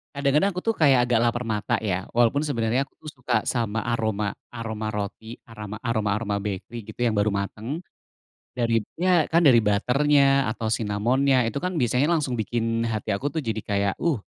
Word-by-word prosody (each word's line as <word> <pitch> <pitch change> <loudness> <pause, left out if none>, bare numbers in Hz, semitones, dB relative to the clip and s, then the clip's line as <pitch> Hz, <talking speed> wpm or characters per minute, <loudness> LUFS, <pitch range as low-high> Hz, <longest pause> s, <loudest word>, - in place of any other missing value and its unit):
Kadang-kadang 140 +7 +2
aku 180 - -2
tuh 225 -1 0
kayak 140 -5 +5
agak 120 -2 +3
lapar 120 +1 0
mata 110 +1 -1
ya. 95 -2 -2
Walaupun 120 +5 +3
sebenarnya 125 -1 0
aku - - -37
tuh 155 - -8
suka 120 -3 0
sama 115 -3 -1
aroma 110 -3 -1 0.2
aroma 110 -2 -5
roti, 105 +3 -5
arama 105 -2 -8
aroma-aroma 105 -3 0
bakery 105 +3 -6
gitu 110 - -11
yang 115 -2 +1
baru 105 +1 +2
mateng. 110 - -4 0.7
Darib 115 -3 0 0.2
ya 180 -3 +4
kan 165 - +5
dari 125 -9 +5
butter-nya 135 +6 +3
atau 110 0 -4
cinnamon-nya, 120 +4 +1
itu 115 - -7
kan 180 +6 -2
biasanya 125 +2 +2
langsung 145 -7 0
bikin 115 +1 -1
hati 110 -2 -3
aku 140 +7 -3
tuh 160 - -1
jadi 110 -5 -3
kayak, 100 -1 0
uh, 160 -10 0
115 Hz, 175 wpm, -24 LUFS, 110-135 Hz, 0.7 s, kayak